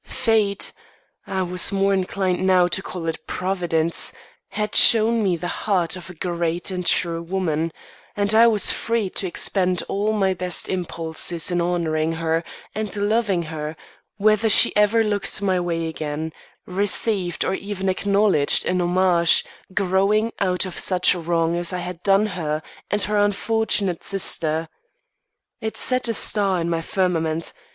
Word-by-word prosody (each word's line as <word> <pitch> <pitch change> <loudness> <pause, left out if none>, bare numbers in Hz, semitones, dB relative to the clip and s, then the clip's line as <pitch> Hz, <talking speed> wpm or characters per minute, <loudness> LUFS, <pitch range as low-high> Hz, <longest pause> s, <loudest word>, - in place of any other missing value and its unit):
Fate 215 -3 0 0.6
I 190 -1 -1
was 180 +2 +2
more 195 0 +1
inclined 185 -1 -1
now 185 -1 +4
to 175 +2 0
call 175 -3 -6
it 165 - -5
Providence 175 -3 -1 0.4
had 210 0 -3
shown 230 0 +6
me 190 -4 +1
the 175 - -5 0.2
heart 180 -3 +1
of 185 0 -10
a 180 - -10
great 170 +1 -3
and 180 -1 -3
true 170 -1 +1
woman; 165 -2 -2 0.5
and 205 +1 +2
I 230 +2 +6
was 215 -3 +4
free 230 -5 -1
to 190 - -2
expend 180 0 0
all 205 +2 -1
my 195 -3 +1
best 180 -1 -1
impulses 170 -1 -3
in 175 0 0
honouring 165 -2 -1
her 165 0 -1 0.3
and 215 -1 -3
loving 205 -3 0
her, 155 -1 -6 0.4
whether 215 +2 +2
she - - +7
ever 210 +2 +3
looked 205 -2 -1
my 190 -2 0
way 165 -2 -2
again, 155 0 -5 0.3
received 195 -1 0
or - - 0
even 195 -1 -4
acknowledged 200 -5 +2
a - - 0
homage 175 -1 +3 0.3
growing 200 +4 +1
out 180 -2 +1
of 185 - -6
such 180 -1 +3
wrong 170 -1 -1
as 175 0 -1
I 180 - -3
had 180 -1 -6
done 195 +2 +3
her 160 -6 -3 0.3
and 205 0 0
her 210 +2 -1
unfortunate 205 -2 0
sister. 165 -4 -1 0.9
It 220 0 -5
set 255 -1 +2
a 230 - -1
star 200 -4 +1
in 170 0 -2
my 165 -1 -1
firmament. 165 -3 -1
185 Hz, 155 wpm, -22 LUFS, 170-205 Hz, 0.9 s, she